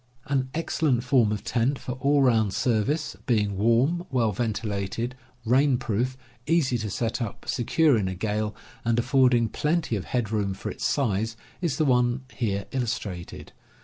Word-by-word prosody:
An 135 Hz, -2 st, 0 dB
excellent 150 Hz, -6 st, +1 dB
form 125 Hz, -4 st, +3 dB
of 105 Hz, -1 st, -3 dB
tent 125 Hz, +5 st, 0 dB
for 125 Hz, -, -6 dB
all 140 Hz, +3 st, +2 dB
round 110 Hz, -6 st, +3 dB
service, 130 Hz, +7 st, 0 dB
being 105 Hz, -5 st, +1 dB
warm, 125 Hz, -, +2 dB
well 120 Hz, -5 st, +1 dB
ventilated, 110 Hz, +1 st, -2 dB, 0.3 s
rain 130 Hz, +3 st, +4 dB
proof, 120 Hz, +3 st, -1 dB, 0.3 s
easy 150 Hz, -7 st, +2 dB
to 110 Hz, -1 st, -3 dB
set 115 Hz, +4 st, -2 dB
up, 110 Hz, -4 st, -5 dB
secure 145 Hz, +5 st, +2 dB
P., 115 Hz, -, +3 dB
in 95 Hz, -, -1 dB
a 95 Hz, -, -3 dB
gale, 105 Hz, +2 st, -2 dB, 0.3 s
and 115 Hz, 0 st, +1 dB
aflFording 125 Hz, -2 st, +3 dB
plenty 155 Hz, -5 st, 0 dB
of 100 Hz, -, -4 dB
head 120 Hz, -2 st, 0 dB
^ 105 Hz, -, -10 dB
room 100 Hz, -3 st, 0 dB
for -, -, -5 dB
its -, -, -2 dB
size, 110 Hz, -3 st, 0 dB, 0.2 s
is 160 Hz, -6 st, 0 dB
the 155 Hz, -, +2 dB
one 125 Hz, -1 st, +2 dB
here 100 Hz, -5 st, -1 dB
illus 125 Hz, -4 st, 0 dB
trated. 90 Hz, -4 st, -8 dB
120 Hz, 175 wpm, -26 LUFS, 105-130 Hz, 0.3 s, rain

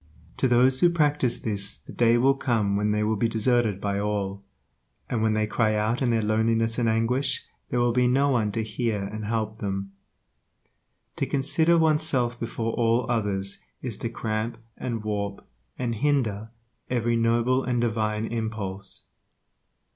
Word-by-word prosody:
To 130 Hz, -, +2 dB
those 130 Hz, +2 st, +4 dB
who 175 Hz, -, +5 dB
practice 150 Hz, -7 st, +1 dB
this 100 Hz, -2 st, -2 dB
the -, -, -13 dB
day 120 Hz, 0 st, +4 dB
will 135 Hz, +3 st, +4 dB
come 115 Hz, -7 st, 0 dB
when 105 Hz, +1 st, +1 dB
they 105 Hz, 0 st, +1 dB
will 110 Hz, +1 st, +1 dB
be 115 Hz, +3 st, +1 dB
deserted 115 Hz, -3 st, +1 dB
by 100 Hz, 0 st, -1 dB
all, 100 Hz, -1 st, -2 dB, 0.6 s
and 115 Hz, -, -1 dB
when 110 Hz, -1 st, +2 dB
they 110 Hz, 0 st, +1 dB
cry 110 Hz, 0 st, +1 dB
out 110 Hz, +4 st, 0 dB
in 130 Hz, -, +2 dB
their 115 Hz, -2 st, +1 dB
loneliness 115 Hz, +2 st, +1 dB
and 115 Hz, -2 st, +2 dB
anguish 120 Hz, +5 st, 0 dB, 0.2 s
there 120 Hz, -, 0 dB
will 120 Hz, 0 st, +3 dB
be 125 Hz, 0 st, +3 dB
no 135 Hz, +3 st, +3 dB
one 115 Hz, -6 st, +1 dB
to 115 Hz, -, -1 dB
hear 110 Hz, -1 st, -2 dB
and 105 Hz, +2 st, -5 dB
help 110 Hz, 0 st, -2 dB
them. 100 Hz, -1 st, -3 dB, 1.3 s
To -, -, -1 dB
consider 150 Hz, +5 st, +2 dB
one's 160 Hz, -1 st, +3 dB
self 125 Hz, -6 st, +1 dB
before 115 Hz, -1 st, -3 dB
all 115 Hz, +1 st, +2 dB
others 100 Hz, -4 st, -1 dB, 0.2 s
is 125 Hz, -5 st, -3 dB
to 115 Hz, -, -3 dB
cramp 110 Hz, 0 st, -3 dB, 0.2 s
and 115 Hz, -3 st, -4 dB
warp 100 Hz, -2 st, -3 dB, 0.3 s
and 120 Hz, -2 st, -1 dB
hinder 115 Hz, -4 st, 0 dB, 0.4 s
every 120 Hz, -1 st, +1 dB
noble 120 Hz, +3 st, +2 dB
and 125 Hz, -2 st, 0 dB
divine 110 Hz, -2 st, 0 dB
impulse. 110 Hz, -4 st, -4 dB
115 Hz, 165 wpm, -26 LUFS, 105-125 Hz, 1.3 s, who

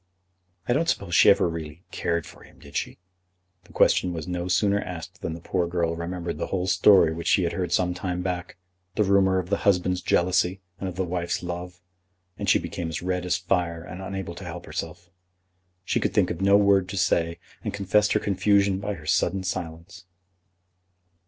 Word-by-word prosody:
"I 120 Hz, -, +3 dB
don't 165 Hz, +5 st, +1 dB
suppose 95 Hz, -, -1 dB
she -, -, +7 dB
ever -, -, +5 dB
really 80 Hz, 0 st, -6 dB
cared 85 Hz, -1 st, -1 dB
for -, -, -14 dB
him; -, -, -17 dB
did -, -, -15 dB
she?" -, -, -2 dB, 0.7 s
The -, -, -18 dB
question 90 Hz, -, +3 dB
was 80 Hz, 0 st, -5 dB
no 90 Hz, 0 st, -3 dB
sooner 100 Hz, +2 st, +2 dB
asked 90 Hz, -3 st, -8 dB
than 80 Hz, -, -3 dB
the -, -, -8 dB
poor 90 Hz, +1 st, -1 dB
girl 85 Hz, -1 st, -1 dB
remembered 85 Hz, -1 st, -4 dB
the -, -, -2 dB
whole 90 Hz, -1 st, -1 dB
story 90 Hz, -2 st, +5 dB
which 85 Hz, +1 st, -5 dB
she 95 Hz, -, +4 dB
had 85 Hz, 0 st, -1 dB
heard 90 Hz, -1 st, -2 dB
some 90 Hz, 0 st, +2 dB
time 90 Hz, 0 st, -3 dB
back, 90 Hz, -1 st, -4 dB, 0.4 s
the 105 Hz, -, +3 dB
rumour 95 Hz, -1 st, +3 dB
of 90 Hz, +1 st, -3 dB
the 100 Hz, -, +3 dB
husband's 90 Hz, -2 st, +1 dB
jealousy 90 Hz, +1 st, +2 dB, 0.2 s
and 95 Hz, -, -3 dB
of 90 Hz, -, -8 dB
the 95 Hz, 0 st, -1 dB
wife's 85 Hz, 0 st, -2 dB
love, 90 Hz, 0 st, -6 dB, 0.5 s
and -, -, -3 dB
she -, -, +6 dB
became 85 Hz, -1 st, -4 dB
as 80 Hz, -, -5 dB
red 90 Hz, 0 st, -2 dB
as 90 Hz, -, +2 dB
fire, 85 Hz, -1 st, -1 dB
and 90 Hz, +2 st, -8 dB
unable 95 Hz, -2 st, -5 dB
to 90 Hz, -, -10 dB
help 85 Hz, -1 st, -7 dB
herself. 90 Hz, +1 st, -6 dB, 0.7 s
She -, -, +1 dB
could -, -, -1 dB
think -, -, +3 dB
of 85 Hz, -, -5 dB
no 100 Hz, +1 st, +6 dB
word 100 Hz, -2 st, +3 dB
to 100 Hz, -, -4 dB
say, 85 Hz, -1 st, +1 dB, 0.3 s
and -, -, -2 dB
confessed 100 Hz, +1 st, +2 dB
her 105 Hz, -, +3 dB
confusion 100 Hz, -1 st, +2 dB
by 100 Hz, +1 st, -3 dB
her 80 Hz, -3 st, -12 dB
sudden 90 Hz, +3 st, +1 dB
silence. 90 Hz, 0 st, -6 dB
90 Hz, 200 wpm, -25 LUFS, 85-95 Hz, 0.7 s, she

